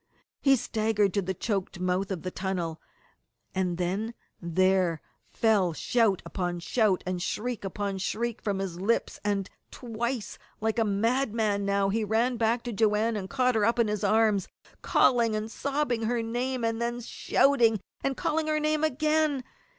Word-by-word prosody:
He 275 -1 +5
staggered 220 -4 0
to 200 - +1
the 190 0 -3
choked 195 -2 -2
mouth 185 +1 0
of 185 -4 -4
the 185 - -3
tunnel, 180 -4 -3 0.7
and 180 -2 -1
then 195 +6 -2 0.3
there 180 -1 +2 0.3
fell 205 -6 +2
shout 220 +2 +1
upon 175 -2 -3
shout, 205 +1 +1
and 180 -1 -2
shriek 235 +5 -3
upon 195 0 -3
shriek 235 +4 -2
from 205 -3 -1
his 185 -2 -4
lips, 230 +4 0
and 200 -2 0 0.2
twice, 235 -1 -4 0.2
like 220 +2 0
a - - +4
madman 220 -1 +1
now, 200 0 +2
he 220 +2 0
ran 230 +4 +1
back 230 +1 +1
to 240 - -4
Joanne 220 +1 +2
and 190 -2 -4
caught 255 -2 +2
her 220 -2 +1
up 230 +3 +2
in 235 -2 +3
his 210 -1 -2
arms, 215 -3 +3 0.3
calling 235 -3 +3
and 215 +1 -3
sobbing 275 -2 -1
her 230 +1 0
name, 245 +2 -2
and 225 0 -1
then 240 +1 -2
shouting 235 -2 +2 0.2
and 275 -1 -1
calling 315 0 0
her 305 0 +1
name 305 0 0
again. 305 -1 +1
220 Hz, 165 wpm, -28 LUFS, 195-240 Hz, 0.7 s, He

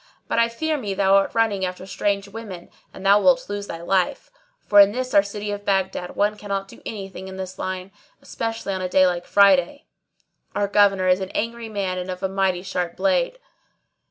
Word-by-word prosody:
But - - 0
I 230 0 +3
fear 310 +6 -2
me 205 -7 -4
thou 195 0 +3
art 195 +4 0
running 215 -4 +1
after 185 0 -4
strange 200 +1 -1
women 200 -4 -9 0.2
and 190 - -11
thou 200 +1 +6
wilt 260 0 +3
lose 205 0 -5
thy 165 0 -7
life; 185 0 0 0.3
for 205 - +5
in 200 0 +7
this 255 +1 -3
our 200 - +7
city 205 +1 -5
of 205 0 -5
Baghdad 190 -2 -1
one 210 +1 +1
cannot 195 -1 -3
do - - -15
any 200 -3 -5
thing 190 0 -9
in 190 0 -8
this 185 0 -7
line, 185 0 -4 0.3
especially 225 -3 -4
on 190 - -3
a 185 - -2
day 185 0 +5
like 175 -1 -1
Friday: 200 - +4 0.7
our 205 0 +1
Governor 195 -2 +3
is 185 +1 +4
an 190 -1 -4
angry 230 0 -3
man 195 -3 -2
and 180 +1 -6
a 185 +1 -2
mighty 190 -2 0
sharp 180 -3 -3
blade." 195 - +1
195 Hz, 205 wpm, -23 LUFS, 185-205 Hz, 0.7 s, in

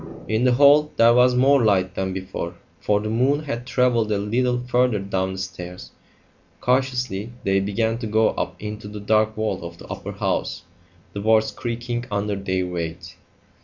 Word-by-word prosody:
In 110 +3 +1
the 125 - +4
hall 145 +3 +5
there 115 +1 +6
was 125 +1 +5
more 135 +1 +4
light 95 -4 +2
than 95 +1 -2
before, 95 -2 -5 0.2
for 105 -1 +1
the 110 +1 -4
moon 135 +6 +2
had 125 -4 -5
travelled 125 -3 +2
a 105 - +2
little 120 +5 0
further 125 -2 +2
down 95 -1 -2
the - - -7
stairs. 90 -1 -7 0.7
Cautiously 125 -4 0
they 95 0 +2
began 110 +4 -1
to 115 - -4
go 110 +1 +3
up - - -3
into 105 0 -6
the 105 0 -7
dark 110 +1 +2
vault 110 -3 -2
of 85 0 -8
the - - -12
upper - - -6
house, - - -2 0.5
the 100 - -4
boards 110 +1 +3
creaking 120 0 -4
under 105 0 -1
their 95 -2 -1
weight. 85 0 -5
110 Hz, 175 wpm, -23 LUFS, 95-125 Hz, 0.7 s, there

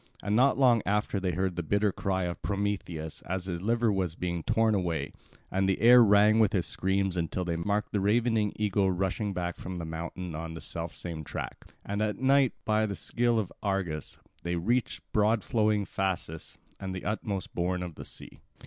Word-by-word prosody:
And 100 - 0
not 130 +4 +4
long 125 -4 +5
after 105 0 0
they 90 -2 -1
heard 95 +1 -1
the 90 - -1
bitter 100 +5 +1
cry 95 0 -1
of 90 -1 -4
Prometheus 100 -6 -3
as 95 0 -2
his 85 -2 -4
liver 115 +2 +2
was 90 -4 -1
being 85 -2 -2
torn 110 +5 +2
away; 85 -7 -1 0.4
and 95 +1 +1
the 95 - +1
air 120 +1 +8
rang 105 +1 +5
with 110 -3 +4
his 90 -3 +1
screams 95 0 0
until 90 +1 -2
they 85 -1 -1
marked 100 +5 -1
the 105 - +1
ravening 110 +1 +2
eagle 100 -2 +1
rushing 95 +3 -1
back 90 -2 -3
from 95 0 -6
the 85 -2 -4
mountain 85 +2 -5
on 80 +1 -5
the - - -6
self 85 +1 -5
same 80 -3 -6
track. - - -7
And 100 +1 -2
at 105 -1 0
night, 135 0 +4
by 110 0 +2
the 100 - -3
skill 120 +2 +1
of 105 -5 -2
Argus, 95 -7 -2 0.2
they 85 0 -2
reached 115 +8 0
broad 110 0 +2
flowing 105 -2 +1
Phasis, 95 -5 -3 0.2
and 95 -1 -4
the 95 - -6
utmost 100 -2 -3
bourne 90 +1 -1
of 90 -2 -6
the - - -9
sea. - - -8
95 Hz, 195 wpm, -29 LUFS, 90-105 Hz, 0.4 s, air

